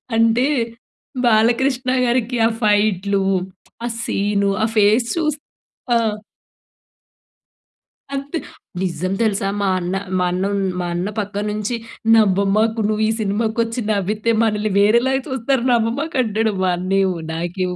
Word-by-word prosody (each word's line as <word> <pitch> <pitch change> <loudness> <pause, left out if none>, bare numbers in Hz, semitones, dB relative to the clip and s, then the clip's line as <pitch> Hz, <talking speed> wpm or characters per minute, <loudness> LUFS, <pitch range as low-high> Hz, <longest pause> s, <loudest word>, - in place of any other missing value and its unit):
అంటే 230 +2 +3 0.8
బాలకృష్ణ 245 +3 +2
గారికి 245 0 0
ఆ - - +1
ఫైట్‌లు, 205 -2 +2 0.6
ఆ - - -1 0.2
సీను, 200 -1 0
ఆ - - +4
ఫేస్ 215 +3 +4
చూసి 305 -3 -1 0.6
ఆ! - - +6 2.2
అంతే. 280 +4 -4 0.4
నిజం 185 0 -2
తెలుసా 205 -3 +1
మా 195 - +1
అన్న, 180 +1 -3 0.2
మా 180 - +1
అన్న, 180 +1 -1
ఉన్ 200 - 0 0.2
మా 175 - -2
అన్న 175 +3 -2
"పక్కన 205 0 -3
నుంచి 215 +3 -2 0.4
నవ్వమాకు. 215 +2 +2
నువ్వు 215 0 0
ఈ - - +1
సినిమాకొచ్చి 225 +3 -1
నవ్వితే 210 +3 0
మనల్ని 215 -1 0
వేరేలాగా 235 +6 +3
చూస్తారు. 260 0 0
నవ్వమాకు" 240 +7 0
అంటాడు. 220 0 0
మా 185 - +2
అన్నయ్య 190 +2 +1 0.2
నాకేమో 180 +2 -3
215 Hz, 120 wpm, -20 LUFS, 195-235 Hz, 2.2 s, ఆ